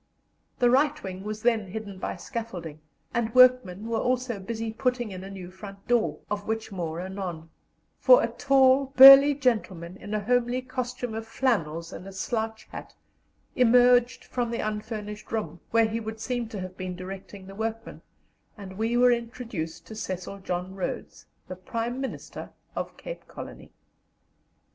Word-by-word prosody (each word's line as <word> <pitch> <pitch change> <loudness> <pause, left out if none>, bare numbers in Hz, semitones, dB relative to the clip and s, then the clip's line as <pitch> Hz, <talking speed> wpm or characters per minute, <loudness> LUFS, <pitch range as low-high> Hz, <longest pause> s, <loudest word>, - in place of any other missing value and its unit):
The 245 -1 +4
right 285 +3 +2
wing 190 0 -6
was 215 +1 -5
then 225 -4 +2
hidden 200 0 -7
by - - -3
scaffolding, 175 - -6 0.3
and 230 -1 -1
workmen 250 -6 +5
were 230 0 -1
also 250 -3 -1
busy 225 +2 -4
putting 250 -2 -1
in 185 0 -7
a 195 - -8
new 185 -2 -9
front 195 +1 -11
door, 240 -2 +2
of 205 -1 -4
which 220 0 -3
more 170 -4 -4
anon; 180 -4 -6 0.5
for - - +7
a - - +2
tall, 270 -1 +3
burly 275 +2 +11
gentleman 195 - -1
in 205 +1 -5
a - - +1
homely 245 +3 +1
costume 250 -2 -4
of 225 0 -5
flannels 170 - -1
and 185 - -9
a - - -8
slouch 220 +2 -3
hat - - -9 0.6
emerged 245 0 +4
from 245 -2 -2
the 235 - -2
unfinished 210 -1 -6
room, 175 -7 -3
where 230 0 +4
he 220 +1 -2
would 220 0 -6
seem 240 0 -3
to 210 - -6
have 185 0 -7
been 185 -1 -5
directing 190 +1 -9
the 195 - -10
workmen, 225 +2 -5 0.6
and 190 -1 -9
we 230 +2 +1
were 250 0 +6
introduced 225 -9 -4
to 195 - -10
Cecil 195 -2 -5
John 180 0 -4
Rhodes, 190 -2 -5 0.2
the 185 - -6
Prime 230 +7 -4
Minister 265 - -6 0.3
of - - -5
Cape - - -8
Colony. - - -10
220 Hz, 160 wpm, -27 LUFS, 190-245 Hz, 0.6 s, burly